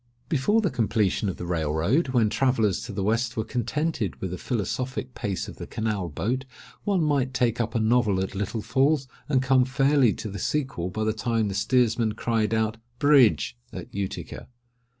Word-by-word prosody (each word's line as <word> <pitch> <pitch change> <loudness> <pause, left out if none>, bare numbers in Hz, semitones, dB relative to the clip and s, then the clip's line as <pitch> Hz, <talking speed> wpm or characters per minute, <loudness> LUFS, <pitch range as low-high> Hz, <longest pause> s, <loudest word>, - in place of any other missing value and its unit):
Before 170 +10 +2
the 195 - 0
completion 105 -3 +1
of 95 - -5
the 90 - -5
Rail 80 -4 -1
road, 100 - +2
when 120 -5 +2
travellers 115 -4 +2
to 115 - -6
the 100 -1 -3
West 115 +3 0
were 110 - +1
contented 125 - -2
with 95 - -4
the 90 - -4
philosophic 125 +3 -3
pace 100 -3 -3
of - - -9
the - - -7
canal 105 -5 -2
boat, 120 - -2 0.4
one 195 -5 +2
might 135 -4 +1
take 120 -1 +1
up 115 - -3
a - - +2
novel 110 -3 +2
at 95 +1 -2
Little 105 +2 -3
Falls, 135 +4 +2 0.2
and 130 -3 +2
come 130 -1 +4
fairly 135 -1 +3
to - - -6
the 100 - -6
sequel 130 - -1
by 110 +4 -3
the 110 0 +1
time 110 -1 0
the - - -3
steersman 115 +1 +2
cried 110 -1 0
out 110 0 0 0.2
"Bridge!" 140 - +4 0.2
at - - -8
Utica. 100 -1 -5
115 Hz, 190 wpm, -26 LUFS, 105-130 Hz, 0.4 s, come